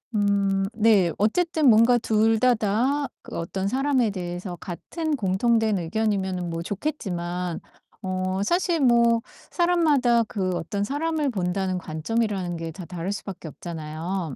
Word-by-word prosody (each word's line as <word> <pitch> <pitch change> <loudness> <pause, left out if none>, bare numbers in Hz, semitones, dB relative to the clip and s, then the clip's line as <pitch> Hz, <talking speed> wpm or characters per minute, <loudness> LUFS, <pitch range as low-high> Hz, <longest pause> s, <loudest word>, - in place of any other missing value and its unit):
음 200 -1 +2
네 210 -6 +4
어쨌든 310 - +2
뭔가 230 +2 +6
둘 220 0 +2
다 250 0 +4
다 240 +7 0 0.2
그 - - -7
어떤 190 +3 -3
사람에 260 0 +1
대해서 180 -1 -5
같은 310 - -4
공통된 220 0 +1
의견이면은 190 -1 -1
뭐 165 0 -4
좋겠지만 180 - -3 0.4
어 185 -1 -2
사실 345 - +1
뭐 235 -2 +4 0.3
사람마다 300 -10 +3
그 195 -4 -2
어떤 200 +5 -3
사람을 300 +4 -1
본다는 185 -1 -1
관점이라는 185 +2 -2
게 165 0 -5
다 175 +2 -9
다를 175 +2 -4
수밖에 195 -4 -6
없잖아요. 160 +1 -5
200 Hz, 280 characters per minute, -25 LUFS, 180-240 Hz, 0.4 s, 뭔가